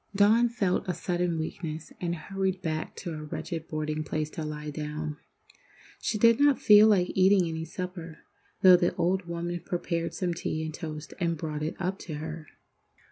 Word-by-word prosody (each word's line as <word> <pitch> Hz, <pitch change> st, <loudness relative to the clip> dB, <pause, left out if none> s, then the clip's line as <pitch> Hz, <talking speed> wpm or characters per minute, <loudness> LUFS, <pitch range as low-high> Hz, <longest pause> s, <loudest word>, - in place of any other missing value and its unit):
Dawn 220 Hz, +4 st, +5 dB
felt 200 Hz, -5 st, 0 dB
a 180 Hz, -, -1 dB
sudden 175 Hz, -2 st, -1 dB
weakness, 160 Hz, 0 st, -5 dB
and 175 Hz, -1 st, -1 dB
hurried 190 Hz, +2 st, -2 dB
back 155 Hz, -2 st, -3 dB
to 175 Hz, -, -6 dB
her 155 Hz, -1 st, -6 dB
wretched 160 Hz, +2 st, -5 dB
boarding 155 Hz, 0 st, -2 dB
place 155 Hz, 0 st, -3 dB
to 160 Hz, -, -5 dB
lie 150 Hz, 0 st, -5 dB
down. 150 Hz, 0 st, -4 dB, 0.8 s
She 215 Hz, -, -1 dB
did 230 Hz, +3 st, +5 dB
not 285 Hz, -2 st, +5 dB
feel 210 Hz, 0 st, +8 dB
like 185 Hz, -4 st, +3 dB
eating 190 Hz, -1 st, +4 dB
any 160 Hz, 0 st, -4 dB
supper, 170 Hz, -1 st, -6 dB, 0.5 s
though 185 Hz, -1 st, +9 dB
the 175 Hz, -1 st, +1 dB
old 185 Hz, +2 st, +1 dB
woman 170 Hz, +1 st, -3 dB
prepared 170 Hz, -1 st, -2 dB
some 180 Hz, -2 st, -1 dB
tea 160 Hz, -1 st, -3 dB
and 155 Hz, -, -5 dB
toast 155 Hz, -1 st, -6 dB
and 170 Hz, -2 st, 0 dB
brought 150 Hz, -1 st, -4 dB
it 155 Hz, +1 st, -2 dB
up 190 Hz, +1 st, -2 dB
to 155 Hz, -, -6 dB
her. 155 Hz, +1 st, -6 dB
170 Hz, 180 wpm, -28 LUFS, 155-185 Hz, 0.8 s, though